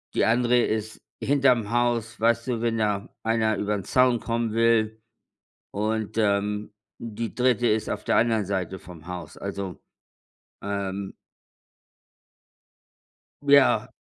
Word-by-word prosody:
Die - - +3
andere 120 +2 +3
ist 110 -1 -2 0.2
hinterm 130 -6 +2
Haus. 120 -1 0
Weißt 115 +2 +2
du, 120 -3 -1
wenn 115 -1 0
da 105 -2 -1
einer 110 -1 +1
über 105 +1 -1
den 100 - -4
Zaun 125 +3 +3
kommen 115 -1 -2
will. 110 -1 +2 0.7
Und, 110 +1 -2
ähm, 105 0 0 0.3
die 115 0 -5
3. 125 -2 +2
ist 110 0 0
auf 105 - -3
der - - +2
anderen 115 -3 +2
Seite 95 -1 -3
vom 85 -3 -13
Haus, 90 -3 -7
also, 100 -2 -5 0.8
ähm 100 -1 -4 2.3
Ja. 140 -1 +4
110 Hz, 125 wpm, -25 LUFS, 100-120 Hz, 2.3 s, Ja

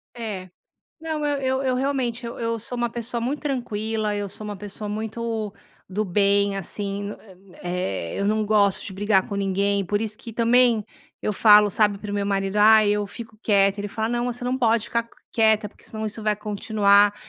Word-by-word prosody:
É. 205 -6 -5 0.5
Não, 315 -2 -3
eu 290 -1 +1
eu 265 0 0
eu 260 -1 +1
realmente 255 -3 -1
eu 235 - -6
eu 230 0 -1
sou 245 +3 -6
uma 240 0 0
pessoa 235 0 -4
muito 270 +5 -2
tranquila, 220 -6 -2
eu 205 -1 -3
sou 215 - -10
uma 205 -1 -5
pessoa 205 +1 -7
muito 220 0 -3 0.4
do 210 +3 -1
bem, 200 +1 +2
assim, 200 +2 -3 0.5
eh, 175 - -3
eu 200 - 0
não 215 +1 +1
gosto 205 -2 +3
de 190 - -5
brigar 200 0 +1
com 200 - -3
ninguém, 200 0 0
por 205 +3 -1
isso 220 -1 -3
que 235 -2 -9
também 235 -1 +3 0.4
eu 210 - 0
falo, 210 0 +6
sabe, 205 0 +2
para 210 0 -7
o - - -3
meu 200 -1 -1
marido: 195 0 -1
"Ai, 215 0 +6
eu 205 0 0
fico 220 +1 -10
quieta", 200 -1 +3
ele 205 - -3
fala: 220 +2 -2
"Não, 240 0 -1
você 245 0 -3
não 250 +1 0
pode 230 -3 +2
ficar 235 0 -1
q 230 - -27 0.2
quieta 220 -2 +3
porque - - -21
senão 220 0 -4
isso 220 +1 -5
vai 215 -1 +2
continuar", 205 -1 +3
215 Hz, 200 wpm, -24 LUFS, 200-230 Hz, 0.5 s, falo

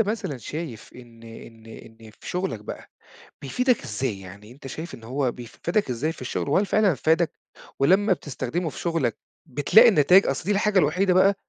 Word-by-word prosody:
مثلًا 210 - -2
شايف 145 -3 -7
إن 120 -2 -15
إن 115 0 -13
إن 115 0 -13
في - - -13
شغلك 180 +2 -3
بقى - - -9 0.5
بيفيدك 250 -1 0
إزاي؟ 110 -4 -3
يعني 100 +4 -12
أنت 135 +2 -13
شايف 160 +6 -7
إن 115 - -12
هو 130 0 -1
بيف 120 -2 -12
فادك 170 -4 0
إزاي 145 +7 -1
في - - -15
الشغل 125 +2 -3
وهل 190 +8 +2
فعلًا 205 -3 +3
فادك 160 +4 +1 0.5
ولمّا 190 +8 +3
بتستخدمه 160 +2 -3
في - - -11
شغلك 165 -10 -1 0.3
بتلاقي 150 - +5
النتايج؟ 185 0 +5
أصل - - -2
دي 195 - -2
الحاجة 205 0 +2
الوحيدة 180 +4 +2
بقى 195 +2 +5
150 Hz, 180 wpm, -24 LUFS, 120-185 Hz, 0.5 s, بتلاقي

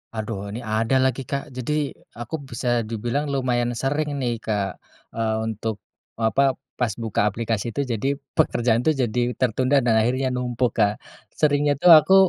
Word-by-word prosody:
Aduh 105 -2 -4
ini 105 - -5
ada 115 +4 +1
lagi 130 +1 0
Kak, 140 +1 -5
jadi 145 +3 -2 0.2
aku 120 +6 -5
bisa 120 -3 0
dibilang 120 +6 -2
lumayan 125 -3 0
sering 145 +3 -1
nih 120 -4 -2
Kak, 105 -3 -2 0.3
eee, 110 -1 0
untuk 110 -1 -3 0.4
apa, 130 +4 +2 0.2
pas 120 -4 +1
buka 115 -4 -1
aplikasi 110 0 -2
tuh 140 +4 -2
jadi 120 0 -2 0.3
pekerjaan 120 -1 +2
tuh 155 +5 +2
jadi 125 -2 0 0.2
tertunda 130 +3 +2
dan 115 - +4
akhirnya 130 +2 0
numpuk 125 -1 0
Kak. 105 +1 +2 0.4
Seringnya 145 -1 +2
tuh 175 +5 +6
aku 160 +5 +7
120 Hz, 155 wpm, -23 LUFS, 110-140 Hz, 0.4 s, aku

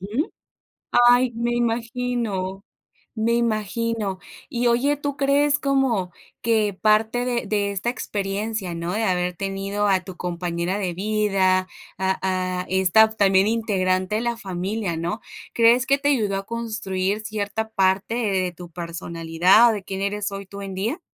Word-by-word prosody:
Ujú. 220 - -2 0.8
Ay, 245 0 +4
me 235 +1 -1
imagino, 230 -5 -2 0.5
me 225 +1 +1
imagino. 220 -2 -1 0.3
Y, 245 -3 -1
oye, 260 +5 +2
tú 285 -1 -4
crees 285 +1 +3
como 265 - +1 0.3
que 215 -3 +2
parte 220 +3 +3
de 240 -2 -1
de 200 -1 0
esta 200 +4 -3
experiencia, 205 -4 -3
¿no? 170 +1 -3
De 220 +2 0
haber 180 -2 0
tenido 195 +2 -2
a 190 -1 +3
tu 185 -1 -10
compañera 175 +2 -2
de 185 -4 -2
vida, 195 -2 +1 0.3
a 190 0 0 0.4
a - - -12
esta, 190 +3 +5
también, 195 -3 +3
integrante 195 -3 0
de 220 - 0
la 235 0 -1
familia, 190 -1 -3
¿no? 175 +7 -3 0.3
¿Crees 235 +2 +4
que 275 +1 +3
te 285 - 0
ayudó 210 -8 +1
a 195 0 -5
construir 215 -4 -2
cierta 215 0 -3
parte 190 +2 +1
de 195 -6 0
tu 175 0 -11
personalidad, 170 +5 +2
de 210 -3 -4
quién 195 0 -4
eres 205 +1 -1
hoy, 195 0 -6
tú, 200 +1 -9
en 195 -1 -6
día? 225 - -2
205 Hz, 150 wpm, -23 LUFS, 190-230 Hz, 0.8 s, esta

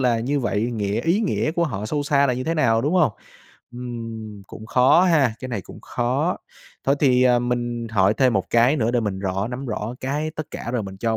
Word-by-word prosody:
là 120 -3 +2
như 140 +5 0
vậy 105 -4 -1
nghĩa 105 -2 -1
ý 170 +6 +1
nghĩa 195 -7 0
của 170 0 +1
họ 105 -8 -4
sâu 145 +6 -1
xa 140 0 +3
là 130 - +1
như 130 +1 -4
thế 165 - -1
nào, 115 -8 +3
đúng 150 +8 0
hông? 165 - +3 0.6
Ừm, 115 -4 -7
cũng 110 - -10
khó 125 +9 +5
ha, 150 -10 +3
cái 130 - -6
này 115 -5 -3
cũng - - -12
khó. 130 +9 -1 0.5
Thôi 135 - +3
thì, 130 -3 +4
ờ, 125 -1 +4
mình 120 -1 -2
hỏi 100 -1 +3
thêm 130 +1 +3
một 95 -3 -1
cái 120 +5 +4
nữa 115 -4 +1
để 120 0 +1
mình 105 -4 -2
rõ 95 +1 -2
nắm 130 +2 -5
rõ 110 0 -4
cái 145 +4 -2
tất 155 - -4
cả 120 - -5
rồi 120 -3 0
mình 95 -1 -8
cho 110 +3 -1
120 Hz, 235 wpm, -22 LUFS, 110-140 Hz, 0.6 s, khó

